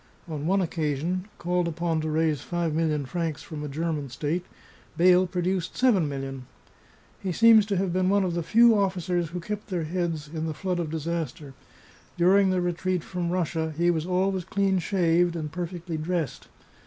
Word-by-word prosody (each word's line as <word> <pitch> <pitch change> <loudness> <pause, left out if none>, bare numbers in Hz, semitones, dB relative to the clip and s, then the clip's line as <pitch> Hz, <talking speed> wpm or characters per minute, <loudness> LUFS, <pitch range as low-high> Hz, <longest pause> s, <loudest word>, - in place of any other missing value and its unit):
On 155 -2 -4
one 195 +2 +3
occasion, 165 +2 -2
called 180 0 0
upon 165 -1 -1
to 155 - -2
raise 155 -1 +1
five 170 -3 -2
million 155 -3 0
francs 165 +1 -3
from 155 -3 -7
a - - -3
German 150 -1 -2
state, 150 +7 -2 0.5
Beyle 180 +1 +5
produced 180 0 -2
seven 210 - +3
millions. 135 -1 -5 0.8
He 190 - -3
seems 220 +2 +6
to 200 -3 0
have 185 -1 0
been 185 0 +2
one 200 0 +3
of 180 -2 -1
the 170 - -1
few 230 +7 +5
officers 180 -4 0
who 180 +2 -5
kept 210 +4 -5
their 180 -5 -2
heads 165 -2 -2
in 160 +1 -4
the 155 - -4
flood 180 +1 -2
of 165 -3 -2
disaster; 160 -3 -4 0.6
during 190 +3 +5
the 185 -1 +1
retreat 175 0 -1
from 180 -2 -3
Russia 165 -3 -1
he 175 +1 +3
was 160 0 -2
always 185 0 +1
clean 195 +1 +1
shaved 175 -2 +2
and 155 -3 -4
perfectly 175 -1 -4
dressed. 160 -1 -3
175 Hz, 180 wpm, -26 LUFS, 160-185 Hz, 0.8 s, seems